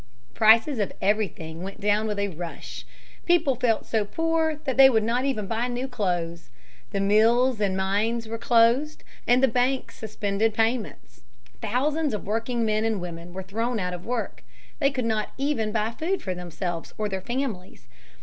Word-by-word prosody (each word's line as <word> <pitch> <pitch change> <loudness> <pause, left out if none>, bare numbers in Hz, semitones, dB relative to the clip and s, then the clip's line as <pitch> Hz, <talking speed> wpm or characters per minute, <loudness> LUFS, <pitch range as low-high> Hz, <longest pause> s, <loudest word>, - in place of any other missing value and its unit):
Prices 225 +4 +5
of 205 - 0
everything 190 -6 -1
went 195 +3 -7
down 210 +1 +1
with 210 -1 -2
a 200 0 0
rush. 170 -1 -8 0.4
People 330 -6 +4
felt 235 -3 0
so 220 -2 0
poor 325 +7 0
that 265 -4 -1
they 270 0 +9
would 220 -4 +2
not 240 +4 0
even 250 -7 -1
buy 225 +4 -1
new 250 +2 -3
clothes. 175 -8 -2 0.4
The 200 - -2
mills 225 +4 +3
and 190 -2 +1
mines 215 +4 0
were 225 +1 -5
closed, 240 +7 +3 0.2
and 245 +2 +4
the - - +7
banks 250 +2 0
suspended 215 0 -1
payments. 225 - -2 0.4
Thousands 290 +4 0
of 210 - -6
working 230 +3 -1
men 215 0 +1
and 225 -2 0
women 170 -1 -7
were 190 +1 -6
thrown 225 +5 -2
out 180 -1 -2
of 175 0 -7
work. 240 -1 -4 0.4
They 275 -3 +4
could 260 -4 -3
not 215 -2 -1
even 270 -6 0
buy 215 0 0
food 345 +10 -2
for 185 - -2
themselves 175 -1 -5
or 215 - -1
their 190 -2 -4
families. 240 -5 -4
220 Hz, 175 wpm, -25 LUFS, 200-250 Hz, 0.4 s, they